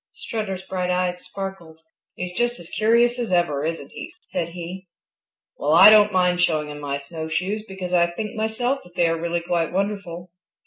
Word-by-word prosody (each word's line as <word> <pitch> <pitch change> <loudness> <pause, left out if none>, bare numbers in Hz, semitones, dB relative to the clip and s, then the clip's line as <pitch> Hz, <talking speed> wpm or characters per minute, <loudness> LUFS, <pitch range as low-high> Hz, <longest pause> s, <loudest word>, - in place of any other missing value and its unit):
Strutter's 215 - -4
bright 180 -1 -3
eyes 180 0 0
sparkled. 190 -4 -7 0.4
"He's 180 0 -5
just 240 +2 0
as 170 -1 -12
curious 235 +3 +3
as 235 -5 -2
ever, 175 -6 +1
isn't 165 +1 -4
he?" 325 - -8
said 170 - -3
he. 180 +2 -8 0.7
"Well, 150 +2 +1
I 210 - +10
don't 210 -1 +6
mind 180 -1 +2
showing 155 -3 +1
him 150 0 -7
my 140 -1 -3
snowshoes 165 +8 -3
because 185 -2 -6
I 170 -1 +4
think 210 +5 -5
myself 220 +5 -1
that 180 0 -18
they 170 - +3
are 165 0 -1
really 170 0 -1
quite 170 -1 -1
wonderful." 185 -3 -3
180 Hz, 180 wpm, -23 LUFS, 170-210 Hz, 0.7 s, I